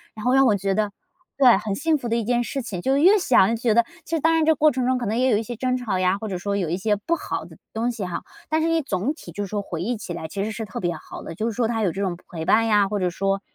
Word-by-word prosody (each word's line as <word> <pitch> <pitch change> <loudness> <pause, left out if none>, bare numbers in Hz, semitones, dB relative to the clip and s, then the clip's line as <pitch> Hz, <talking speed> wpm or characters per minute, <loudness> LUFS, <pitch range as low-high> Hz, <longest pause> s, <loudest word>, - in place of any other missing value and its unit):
然 215 - -8
后 250 - +3
让 270 0 +5
我 215 - +4
觉 195 0 -1
得 210 0 0 0.5
对， 255 -4 +7
很 205 -1 -3
幸 320 +5 +1
福 240 - -4
的 230 - +1
一 235 - 0
件 240 +2 +1
事 270 +2 -4
情。 190 -7 -5
就 265 +7 +2
越 375 +8 +6
想 240 - +4
越 230 - +1
觉 230 -1 +1
得 235 0 +5 0.2
其 330 - -2
实 - - 0
当 325 +2 +3
然 325 -1 +3
这 320 0 +4
过 305 0 +4
程 255 -2 -1
中 255 0 +2
可 245 - -3
能 225 +3 -1
也 260 +1 +3
有 215 - +3
一 220 - -2
些 240 +2 -6
争 255 +2 0
吵 220 -7 -2
呀， 185 +1 +2
或 220 +2 -6
者 185 -3 -3
说 200 +2 -2
有 185 -4 -1
一 175 - 0
些 210 +2 +1
不 210 +12 -1
好 - - -4
的 - - -14 0.2
东 235 +2 0
西 225 -4 -5
哈。 180 - -4 0.3
但 315 - +2
是 330 - +1
你 330 0 +2
总 235 0 -1
体 310 - -12
就 205 - -4
是 - - -4
说 205 +1 -2
回 170 -4 -5
忆 235 +4 -1
起 195 -4 -6
来 160 - -5
其 195 +5 -3
实 215 - -3
是 220 +1 -5
特 200 - -6
别 175 -2 -1
好 - - -10
的， 165 - -8
就 215 - -2
是 230 - 0
说 235 0 +1
她 225 -1 -1
有 185 - +2
这 195 - -5
种 185 -3 -1
陪 160 -2 -5
伴 225 +7 +4
呀， 205 -2 +3
或 205 0 -1
者 180 -1 +1
说， 195 +2 -1
220 Hz, 365 characters per minute, -23 LUFS, 195-255 Hz, 0.5 s, 对